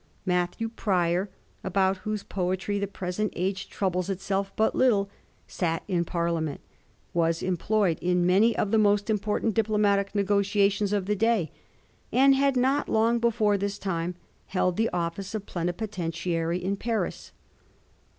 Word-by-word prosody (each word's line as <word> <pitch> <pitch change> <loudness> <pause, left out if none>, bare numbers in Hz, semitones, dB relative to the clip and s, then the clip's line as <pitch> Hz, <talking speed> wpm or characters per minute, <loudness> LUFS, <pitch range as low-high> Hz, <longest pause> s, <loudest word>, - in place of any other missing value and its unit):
Mat 180 -1 0
thew 225 - -3
Prior, 185 -4 0 0.3
about 190 0 +1
whose 210 +2 -4
poetry 190 +2 -2
the 200 - -1
present 190 +2 -3
age 190 +2 -2
troubles 185 -1 -1
itself 195 +1 -2
but 220 - +2
little, 200 -6 +2 0.3
sat 165 -3 -2
in 175 -3 0
Parliament, 170 -3 -1 0.5
was 165 -1 +1
employed 185 -1 +1
in 180 0 +2
many 200 +6 +4
of 205 - 0
the 220 - +4
most 205 0 +3
important 210 +1 0
diplo 215 -1 +1
matic 200 -1 +2
negotiations 200 0 +2
of 205 -2 0
the 210 +2 0
day, 220 -5 +1 0.6
and 270 +2 +5
had 275 -1 +2
not 265 +3 +1
long 230 +2 +3
before 220 -3 +2
this 200 +1 -2
time 175 -3 -3 0.3
held 180 -2 0
the 225 +3 +1
office 180 +4 -3
of 205 -2 -4
Plenipotentiary 175 -2 -2
in 190 +2 -2
Paris. 225 +1 -3
200 Hz, 145 wpm, -27 LUFS, 180-215 Hz, 0.6 s, and